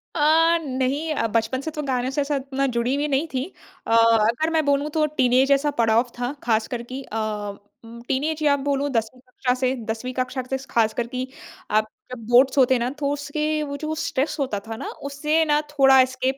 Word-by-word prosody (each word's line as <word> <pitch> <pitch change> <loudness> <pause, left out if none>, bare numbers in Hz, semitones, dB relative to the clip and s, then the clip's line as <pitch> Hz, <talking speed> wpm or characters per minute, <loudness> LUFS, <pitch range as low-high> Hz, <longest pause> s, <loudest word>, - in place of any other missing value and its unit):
अ, 325 +2 +4
नहीं 275 +3 -1
अ, 230 - 0
बचपन 230 +4 -1
से 315 - -5
तो 300 -1 -4
गानों 255 -2 -1
से 290 - 0
ऐसा 285 +1 -1
उतना 275 0 -2
जुड़ी 235 +3 +1
हुई 290 +1 -1
नहीं 285 +3 0
थी। 260 0 -1 0.4
अ, - - -2
अगर 230 +6 +4
मैं 315 - +2
बोलूँ 285 +1 +1
तो 310 -1 +2
टीनएज 255 +2 +3
ऐसा 280 +1 +3
पड़ाव 230 +2 +3
था 245 +2 -2
ख़ासकर 235 +1 0
कि 265 - -5
अ, 225 - -6 0.7
उम, 235 +1 -11
टीनएज 300 +4 -1
या 285 -1 +4
बोलूँ 280 0 0
10वीं 230 +1 -2
कक्षा 250 0 -2
से। 260 0 +1
10वीं 225 +3 -4
कक्षा 255 +1 -2
से 265 - 0
ख़ासकर 230 +1 +1
कि 255 +1 -4 0.4
आप 215 0 +2 0.3
जब 250 - -7
बोर्ड्स 255 +3 +5
होते 260 -1 +5
हैं 245 - +2
ना 245 - 0
तो 280 -1 0
उसके 300 +2 -2
वो 285 -1 -5
जो 310 +2 -3
स्ट्रेस 290 -2 -1
होता 255 -8 -1
था 225 - -5
ना - - -6 0.2
उससे 300 +3 +1
ना 295 -1 +3
थोड़ा 270 -2 +5
एस्केप 260 +1 -1
265 Hz, 205 wpm, -23 LUFS, 245-290 Hz, 0.7 s, बोर्ड्स